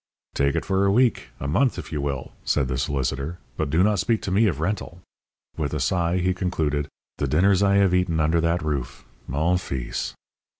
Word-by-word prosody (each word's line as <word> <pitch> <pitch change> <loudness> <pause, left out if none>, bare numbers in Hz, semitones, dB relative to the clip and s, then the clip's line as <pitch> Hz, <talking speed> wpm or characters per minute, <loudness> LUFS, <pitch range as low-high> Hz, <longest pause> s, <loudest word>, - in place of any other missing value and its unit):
"Take 70 0 +1
it - - -1
for 95 0 +1
a - - +4
week 120 - +2
a - - -3
month, 125 - +2
if - - -7
you 75 -3 -2
will," 70 -2 -3
said 70 -3 +1
the 65 0 -2
solicitor; 70 +3 -2 0.2
"but - - -2
do 80 +5 +3
not 105 -1 +2
speak 115 +2 +1
to 95 - -3
me 105 +4 +4
of 80 -7 -1
rental." 90 0 -3 0.6
With 75 -2 -2
a - - -1
sigh 85 +5 +1
he 90 +1 +1
concluded: 80 -6 -1 0.3
"The 70 - 0
dinners 95 +7 +3
I 100 0 +4
have 100 -2 +4
eaten 90 -3 +1
under 80 +2 +2
that 85 +1 +1
roof, 70 -3 -3 0.2
mon 80 +7 +1
fils!" 65 -8 -4
85 Hz, 205 wpm, -24 LUFS, 70-95 Hz, 0.6 s, a